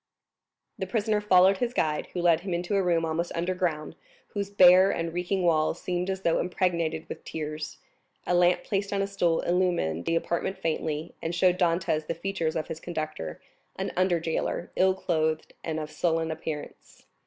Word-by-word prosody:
The - - -2
prisoner 215 -2 0
followed 190 -1 +5
his 245 0 -1
guide, 150 -1 0
who 175 - -2
led 170 -2 +5
him 180 0 -3
into 175 +3 -2
a 195 - +3
room 170 -3 +2
almost 165 +2 -2
under 175 +2 0
ground, 165 -4 -2 0.3
whose 200 -1 -3
bare 185 -1 +7
and 165 -3 -2
reeking 180 +2 -1
walls 160 -1 +2
seemed 180 +1 -2
as 190 0 -2
though 170 - +2
impregnated 170 -3 -1
with - - -8
tears; 155 0 -5 0.5
a - - 0
lamp 175 0 +4
placed 200 0 -2
on 200 -1 +1
a - - +1
stool 175 -4 +1
illumined 175 - 0
the 165 - +1
apartment 170 +3 -1
faintly, 160 -2 -2
and 165 +1 -3
showed 180 0 +3
Dantès 165 -3 +1
the - - -2
features 170 -2 -2
of 160 - -2
his 160 - -6
conductor, 155 - -5 0.4
an - - -3
under 185 -2 +2
jailer, 165 +1 -2
ill 190 0 +3
clothed, 160 -4 -1
and 160 -1 -2
of 155 0 -6
sullen 165 -1 0
appearance. 155 -1 -7
175 Hz, 180 wpm, -27 LUFS, 160-185 Hz, 0.5 s, bare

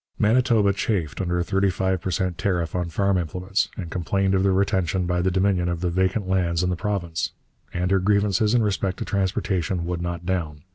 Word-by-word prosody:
Manitoba 110 -2 +3
chafed 95 -7 -2
under 90 -1 -1
a 90 - +1
thirty 95 +1 +1
five 95 -1 -1
per 95 - -3
cent 90 0 -1
tariff 90 -6 -1
on 90 -2 -2
farm 100 +2 +1
implements, 90 +4 -1
and 85 -4 -6
complained 95 +2 0
of 95 - +3
the 95 0 +3
retention 95 -2 +1
by 90 0 0
the 95 - +2
Dominion 95 -1 +1
of 85 -1 -3
the 90 -1 0
vacant 95 +3 0
lands 90 -2 +1
in 90 - +1
the - - 0
province. 90 -4 -2 0.4
And 90 +1 -1
her 95 - +4
grievances 105 +2 +2
in 120 - +3
respect 95 -2 -1
to - - -4
transportation 95 -3 -1
would 85 0 -3
not 85 -1 -4
down. 80 -5 -2
95 Hz, 205 wpm, -24 LUFS, 85-100 Hz, 0.4 s, her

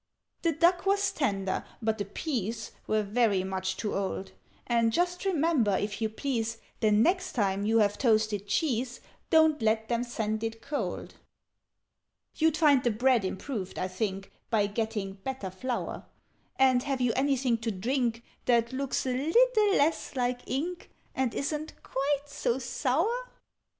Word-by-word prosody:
"The 335 -2 +2
duck 350 +5 +3
was 400 0 +3
tender, 195 - -1 0.2
but 220 -1 -1
the 205 - -1
peas 225 - -3 0.2
Were 215 0 +2
very 205 -2 +2
much 190 0 -2
too 210 - -2
old: 195 0 -3 0.3
And 230 -1 +2
just 355 - 0
remember, 310 - +2
if 205 +1 -3
you 220 - +1
please, 230 -1 -2 0.2
The 215 - +3
next 345 - +2
time 200 -2 0
you 225 +1 +3
have 205 -2 +2
toasted 215 -4 +2
cheese, 245 0 0 0.3
Don't 315 -4 +4
let 220 0 +1
them 235 0 +1
send 220 -2 -2
it 225 0 -3
cold. 290 - -4 1.2
"You'd 320 -1 +2
find 290 -5 +5
the 240 - +3
bread 240 +1 +3
improved, 190 +1 -4
I 185 - -1
think, 195 0 -3 0.2
By 215 -3 +3
getting 205 -2 -3
better 260 -8 -4
flour: 245 +7 -4 0.5
And 260 -2 +4
have 275 0 -2
you 245 -2 +2
anything 265 -3 +1
to 225 0 -2
drink 235 +3 -1 0.2
That 235 0 +2
looks 270 0 -1
a 255 - 0
little 420 - +4
less 295 0 +1
like 245 -1 0
ink, 340 +7 -3 0.2
And 260 -3 -1
isn't 300 +2 -2
quite 280 +1 -1
so 255 -3 -1
sour?" 325 - 0
240 Hz, 150 wpm, -29 LUFS, 215-285 Hz, 1.2 s, find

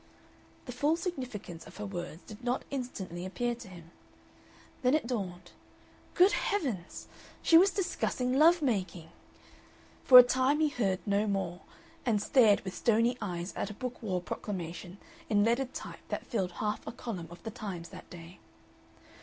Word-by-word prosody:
The 250 - -6
full 290 +6 +2
significance 255 - -6
of - - -13
her 210 - -5
words 175 -3 -6
did 215 +2 -12
not 245 +1 -1
instantly 200 -10 -5
appear 240 +6 -2
to 235 - -10
him. 170 -3 -13 0.9
Then 255 +2 +3
it 310 - 0
dawned. 185 -7 -4 0.6
Good 370 +3 +6
heavens! 265 - -2 0.4
She 330 - +5
was 370 +4 +8
discussing 345 -10 -1
love 320 +4 +5
making. 185 - -1 0.9
For 255 - +9
a 250 - +13
time 260 +4 +2
he 310 -1 +3
heard 200 -9 -1
no 205 +1 +1
more, 195 -3 -2 0.4
and 225 -4 +2
stared 220 -2 +4
with 190 - -6
stony 235 +2 +2
eyes 180 -2 -4
at - - -2
a 210 - -8
Book 250 +2 -6
War 190 -5 -1
proclamation 180 0 -6 0.3
in 205 -1 +4
leaded 245 +4 +1
type - - -7
that - - -3
filled 190 -7 -2
half 210 +4 -3
a - - -3
column 220 -8 -6
of 175 0 -13
the 225 - -5
Times 185 -6 -6
that 185 - -12
day. 170 0 -11
215 Hz, 160 wpm, -31 LUFS, 180-255 Hz, 0.9 s, a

